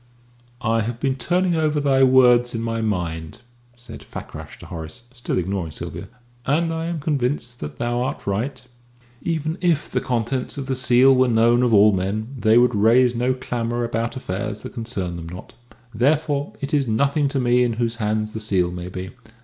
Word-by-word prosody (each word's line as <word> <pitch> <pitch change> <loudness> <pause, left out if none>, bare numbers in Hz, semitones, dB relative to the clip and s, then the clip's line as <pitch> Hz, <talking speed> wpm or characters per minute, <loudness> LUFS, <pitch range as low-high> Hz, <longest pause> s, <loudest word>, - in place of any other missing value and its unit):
"I 115 0 +2
have 115 +2 -4
been 135 0 +1
turning 175 +8 0
over 155 -2 +1
thy 135 -2 +2
words 125 -2 +5
in 115 - -2
my 115 0 -2
mind," 85 -5 -3 0.3
said 120 0 -11
Fakrash - - -9
to - - -12
Horace, 80 +8 -8
still 120 -1 -3
ignoring 90 -1 -2
Sylvia, - - -7 0.4
"and 165 +5 +1
I 165 0 -3
am 170 -1 -3
convinced 130 -4 -2
that 75 - -7
thou 120 +1 -1
art 130 - -3
right. 120 +6 -2 0.6
Even 160 0 -2
if 170 -4 +1
the - - 0
contents 125 +2 -2
of 140 - -4
the 135 - -1
seal 130 +1 +5
were 130 0 +4
known 120 +1 +4
of 125 -2 +2
all 105 0 +6
men, 100 +4 -2
they 110 -2 +3
would 120 0 +4
raise 120 +4 +4
no 125 +2 0
clamour 120 -2 -2
about 115 +1 -2
affairs 105 -2 -4
that - - -8
concern 105 -8 -4
them 85 -1 -7
not. 90 +2 -10 0.4
Therefore 145 +4 +1
it 140 +2 -4
is 140 -3 +2
nothing 140 +6 +1
to 140 0 -1
me 125 0 +3
in 120 -1 0
whose 115 0 -2
hands 110 -1 -1
the 110 - -5
seal 95 -5 0
may 90 0 -6
be. 95 0 -6
120 Hz, 190 wpm, -22 LUFS, 110-135 Hz, 0.6 s, all